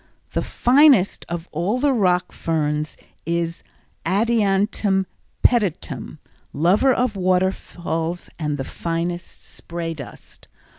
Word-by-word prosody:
The - - 0
finest 260 -6 +4
of 170 0 -4
all 175 +9 0
the 275 +1 +2
rock 180 -6 +2
ferns 150 -2 -1 0.3
is 170 0 -2 0.4
Adiantum 200 -2 +2 0.4
pedatum, 210 -9 +1 0.4
lover 190 - +3
of 250 -3 +1
waterfalls 180 -2 -1
and 150 -2 -1
the 135 - -3
finest 170 +1 -4
spray 170 -1 -5
dust. 140 -5 -12
180 Hz, 100 wpm, -22 LUFS, 165-210 Hz, 0.4 s, finest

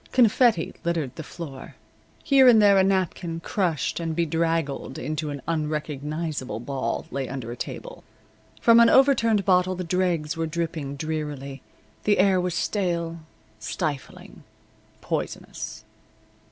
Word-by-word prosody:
Confetti 235 -6 +3
littered 165 -6 -2
the - - -6
floor. 150 -4 -9 0.5
Here 275 -4 +6
and 235 -3 +8
there 200 -2 +6
a - - +5
napkin, 185 -3 0
crushed 170 -5 -1
and 165 -1 -3
bedraggled 165 -4 -1
into 155 +3 -3
an 140 -2 -6
unrecognizable 150 -5 -3
ball, 135 +3 -3
lay 135 -2 -3
under 130 -4 -5
a - - -5
table. - - -7 0.6
From 230 0 +6
an 235 0 +7
overturned 230 -7 +4
bottle 185 -1 +3
the 180 - -4
dregs 170 -3 0
were 165 0 -2
dripping 160 -3 -3
drearily. 145 -3 -4 0.4
The 210 - +3
air 190 -1 +4
was 180 -1 -2
stale, 170 -4 -1 0.4
stifling, 150 -6 -5 0.6
poisonous. - - -5
165 Hz, 125 wpm, -25 LUFS, 150-185 Hz, 0.6 s, and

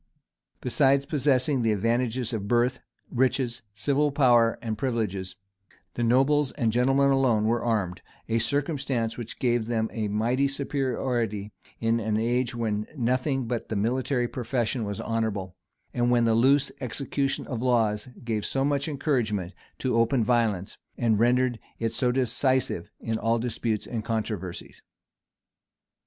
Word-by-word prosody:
Besides 135 +2 +3
possessing 140 -1 +2
the 115 -1 +2
advantages 120 +3 0
of 100 -3 -3
birth, 120 +2 +2 0.3
riches, 125 -1 0
civil 145 +5 +1
powers 120 -5 +4
and 110 -2 -3
privileges, 105 -6 -2 0.6
the - - -4
nobles 135 +4 +3
and 115 -6 0
gentlemen 135 +4 +3
alone 125 -6 +3
were 115 +1 +1
armed 105 -6 -1 0.3
a 115 0 +1
circumstance 135 -3 -1
which 120 -2 -7
gave 120 -3 +1
them 110 -2 -1
a 110 -2 -1
mighty 120 +7 +1
superiority, 125 -6 -2 0.3
in 115 0 +1
an 110 -1 0
age 120 +2 0
when 110 -2 -1
nothing 130 +2 0
but 115 0 -3
the 110 - -2
military 120 +4 0
profession 120 -1 -2
was 100 -1 -4
honorable, 105 -5 -2 0.4
and 120 0 +1
when 120 -1 +4
the 115 - +3
loose 135 +5 +4
execution 135 +2 -2
of 125 -4 -4
laws 115 -3 +1
gave 110 -3 -2
so 135 +5 0
much 140 0 0
encouragement 115 - -1 0.2
to 130 -3 -1
open 115 +1 +3
violence, 110 -5 0 0.2
and 115 -3 +2
rendered 120 0 +2 0.2
it 115 -1 -2
so 125 -2 +1
decisive 130 -6 0
in 115 -1 -2
all 115 +1 +2
disputes 115 -2 -2
and 115 -3 -4
controversies. 105 -5 -4
120 Hz, 140 wpm, -26 LUFS, 110-130 Hz, 0.6 s, powers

